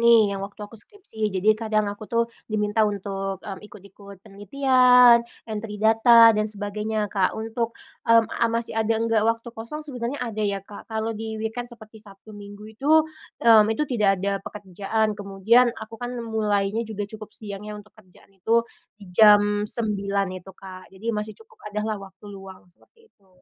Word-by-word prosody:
nih 230 Hz, -3 st, +5 dB
yang 195 Hz, -, -4 dB
waktu 200 Hz, +1 st, -8 dB
aku 205 Hz, -, -15 dB
skripsi 225 Hz, -, -6 dB
jadi 195 Hz, +3 st, +3 dB
kadang 215 Hz, -1 st, -1 dB
aku 205 Hz, +1 st, -6 dB
tuh 235 Hz, 0 st, +1 dB, 0.2 s
diminta 210 Hz, 0 st, -1 dB
untuk, 195 Hz, -1 st, -4 dB
mmm, 195 Hz, -2 st, -7 dB
ikut-ikut 200 Hz, -1 st, -15 dB
penelitian, 250 Hz, +3 st, +5 dB, 0.2 s
entry 215 Hz, -1 st, -6 dB
data 225 Hz, +2 st, +6 dB
dan 215 Hz, 0 st, -1 dB
sebagainya 210 Hz, 0 st, -3 dB
Kak 190 Hz, -3 st, 0 dB
untuk, 225 Hz, +1 st, -4 dB, 0.3 s
mmm, 230 Hz, 0 st, +6 dB, 0.2 s
masih 230 Hz, 0 st, -3 dB
ada 225 Hz, 0 st, 0 dB
nggak 225 Hz, -1 st, +1 dB
waktu 230 Hz, +1 st, -2 dB
kosong? 245 Hz, +7 st, -7 dB
Sebenernya 250 Hz, -2 st, -4 dB
ada 220 Hz, -3 st, -5 dB
ya 200 Hz, -2 st, -2 dB
Kak 205 Hz, 0 st, -12 dB
kalo 220 Hz, 0 st, -2 dB
di-weekend 220 Hz, +2 st, -5 dB
seperti 220 Hz, -2 st, -14 dB
Sabtu 210 Hz, 0 st, -14 dB
Minggu 205 Hz, 0 st, -11 dB
itu, 270 Hz, +7 st, -5 dB, 0.6 s
mmm, 220 Hz, -2 st, +7 dB
itu 220 Hz, +7 st, 0 dB
tidak 210 Hz, -8 st, +1 dB
ada 195 Hz, +2 st, -2 dB
pekerjaan 205 Hz, +2 st, -3 dB
kemudian 205 Hz, +5 st, +2 dB
aku 225 Hz, 0 st, -10 dB
kan 245 Hz, -, -4 dB, 0.2 s
mulainya 210 Hz, -1 st, -1 dB
juga 210 Hz, -1 st, -4 dB
cukup 215 Hz, +1 st, -10 dB
siang 205 Hz, -1 st, -8 dB
ya 210 Hz, -, -6 dB
untuk 210 Hz, 0 st, -14 dB
kerjaan 195 Hz, -2 st, -22 dB
itu 225 Hz, +5 st, +1 dB, 0.3 s
di 210 Hz, -, -14 dB
jam 205 Hz, +1 st, +5 dB
9.00 200 Hz, -3 st, -1 dB, 0.2 s
itu 190 Hz, -, -13 dB
Kak 185 Hz, -1 st, -12 dB
jadi 210 Hz, +5 st, -5 dB
masih 210 Hz, 0 st, -4 dB
cukup 445 Hz, -, -14 dB
ada 210 Hz, 0 st, -3 dB
lah 215 Hz, -2 st, -3 dB
waktu 195 Hz, +1 st, -14 dB
luang 195 Hz, -1 st, -12 dB
seperti 455 Hz, -, -28 dB
itu. 195 Hz, -2 st, -33 dB
215 Hz, 170 wpm, -24 LUFS, 200-230 Hz, 0.6 s, mmm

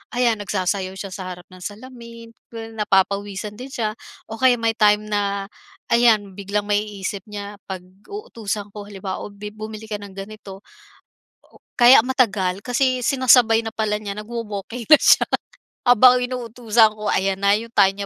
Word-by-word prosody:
ayan 240 Hz, -3 st, +2 dB
nagsasayaw 190 Hz, -1 st, -2 dB
siya 195 Hz, 0 st, -7 dB
sa 185 Hz, 0 st, -6 dB
harap 180 Hz, -1 st, -8 dB
ng 185 Hz, -, -13 dB
salamin 230 Hz, +3 st, -10 dB, 0.5 s
napapawisan 200 Hz, +1 st, 0 dB
din 255 Hz, -, -7 dB
siya 230 Hz, -5 st, -2 dB, 0.4 s
o 225 Hz, -, -6 dB
kaya 260 Hz, -1 st, +5 dB
may 230 Hz, 0 st, +2 dB
time 210 Hz, 0 st, +4 dB
na 200 Hz, -1 st, -1 dB, 0.5 s
ayan 225 Hz, -4 st, +4 dB
biglang 200 Hz, +1 st, -2 dB
maiisip 205 Hz, -1 st, -2 dB
niya 205 Hz, 0 st, -7 dB
pag 190 Hz, -2 st, -5 dB, 0.3 s
uutusan 215 Hz, -, -5 dB
ko 205 Hz, 0 st, -9 dB
halimbawa 195 Hz, -2 st, -6 dB
o, -, -, -6 dB
bi 205 Hz, +1 st, -8 dB
"bumili 215 Hz, 0 st, -8 dB
ka 210 Hz, -, -3 dB
ng 200 Hz, -1 st, -11 dB
ganito" 195 Hz, -1 st, -9 dB, 0.9 s
o -, -, -21 dB, 0.2 s
kaya 245 Hz, +1 st, +8 dB
matagal 200 Hz, -8 st, +1 dB
kasi 255 Hz, +1 st, +1 dB
sinasabay 245 Hz, -3 st, +4 dB
na 225 Hz, -, -4 dB
pala 215 Hz, -1 st, 0 dB
niya 205 Hz, -2 st, -6 dB
nagwo-walking 225 Hz, +1 st, -6 dB
na 310 Hz, -, +9 dB
siya -, -, +6 dB, 0.6 s
habang 250 Hz, +1 st, +7 dB
inuutusan 235 Hz, -3 st, +1 dB
ko 215 Hz, -1 st, -5 dB
ayan 195 Hz, 0 st, 0 dB
na 200 Hz, +1 st, +4 dB
yung 230 Hz, +1 st, -9 dB
time 200 Hz, 0 st, +3 dB
210 Hz, 155 wpm, -21 LUFS, 200-235 Hz, 0.9 s, na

